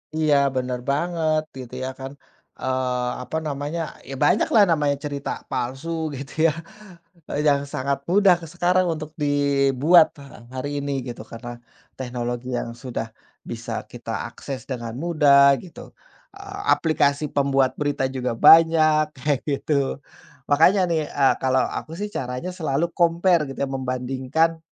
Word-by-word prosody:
Iya, 155 Hz, -2 st, +3 dB, 0.2 s
bener 125 Hz, -1 st, -2 dB
banget, 155 Hz, +1 st, +1 dB, 0.2 s
gitu, 125 Hz, -2 st, -9 dB
ya. 130 Hz, -, -2 dB
Kan, 135 Hz, 0 st, -6 dB, 0.5 s
eee, 125 Hz, -1 st, -1 dB
apa 160 Hz, -, -4 dB
namanya, 145 Hz, +3 st, -3 dB, 0.3 s
ya, 135 Hz, -, -5 dB
banyak 195 Hz, -, +3 dB
lah 210 Hz, -, +8 dB
namanya 145 Hz, -3 st, +2 dB
cerita 140 Hz, -1 st, -4 dB, 0.2 s
palsu, 135 Hz, +6 st, -3 dB, 0.3 s
gitu, 140 Hz, +1 st, -8 dB, 0.2 s
ya, -, -, +2 dB, 1.0 s
yang 140 Hz, -1 st, +3 dB
sangat 135 Hz, +1 st, -1 dB
mudah 195 Hz, -2 st, +6 dB, 0.2 s
sekarang 180 Hz, +1 st, +2 dB
untuk 155 Hz, -1 st, -7 dB
dibuat 145 Hz, +2 st, +4 dB
ha 135 Hz, -5 st, -13 dB
hari 130 Hz, +2 st, -3 dB
ini, 140 Hz, 0 st, -3 dB
gitu, 120 Hz, -3 st, -7 dB
karena 120 Hz, +1 st, -7 dB, 0.5 s
teknologi 125 Hz, 0 st, -4 dB
yang 115 Hz, -, -5 dB
sudah 120 Hz, -1 st, -5 dB, 0.4 s
bisa -, -, -5 dB, 0.2 s
kita -, -, -5 dB
akses 135 Hz, -2 st, -8 dB
dengan 115 Hz, -2 st, -4 dB
mudah, 140 Hz, -4 st, +5 dB
gitu, 180 Hz, -, -11 dB, 0.5 s
a 400 Hz, +1 st, -4 dB
aplikasi 150 Hz, -2 st, +1 dB
pembuat 135 Hz, -2 st, +2 dB
berita 145 Hz, -2 st, -1 dB
juga 125 Hz, -2 st, -2 dB
banyak, 155 Hz, +2 st, +6 dB
kayak 140 Hz, +1 st, -1 dB
gitu. 140 Hz, -1 st, -1 dB, 0.5 s
Makanya, 180 Hz, +7 st, +5 dB
nih, 155 Hz, -2 st, 0 dB
eee, 140 Hz, -2 st, +2 dB
kalau 130 Hz, 0 st, +3 dB
aku, 155 Hz, -, -5 dB
sih, 205 Hz, +4 st, -4 dB
caranya 125 Hz, +5 st, -4 dB
selalu 160 Hz, -2 st, -1 dB
compare, 170 Hz, -2 st, +2 dB
gitu, -, -, -9 dB
ya, 140 Hz, -, -2 dB
membandingkan, 130 Hz, +5 st, -1 dB
140 Hz, 140 wpm, -23 LUFS, 130-160 Hz, 1.0 s, lah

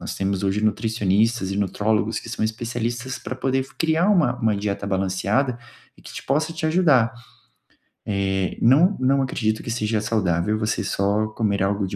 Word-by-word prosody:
nós -, -, -5 dB
temos 95 Hz, 0 st, -2 dB
hoje 100 Hz, +2 st, 0 dB
nutricionistas 110 Hz, -1 st, +1 dB
e 100 Hz, -, -3 dB
nutrólogos 105 Hz, +3 st, 0 dB
que -, -, -10 dB
são 110 Hz, -, -2 dB
especialistas 120 Hz, +3 st, -3 dB
para 130 Hz, -, -6 dB
poder 130 Hz, 0 st, -1 dB
criar 165 Hz, +4 st, +2 dB
uma 165 Hz, -11 st, +3 dB
uma 110 Hz, -2 st, +2 dB
dieta 100 Hz, 0 st, -3 dB
balanceada, 100 Hz, +6 st, 0 dB, 0.4 s
que -, -, -20 dB
te -, -, -7 dB
possa 155 Hz, +4 st, 0 dB
te 160 Hz, -1 st, -3 dB
ajudar. 155 Hz, -9 st, +3 dB, 1.0 s
Eh, 95 Hz, -2 st, -1 dB
não 155 Hz, -, +5 dB
não 135 Hz, +1 st, +2 dB
acredito 110 Hz, -4 st, -1 dB
que -, -, -6 dB
seja 110 Hz, -2 st, 0 dB
saudável 105 Hz, -2 st, 0 dB
você 110 Hz, -1 st, -1 dB
só 100 Hz, +2 st, 0 dB
comer 105 Hz, -3 st, -1 dB
algo 100 Hz, 0 st, 0 dB
de -, -, -5 dB
110 Hz, 165 wpm, -23 LUFS, 100-130 Hz, 1.0 s, não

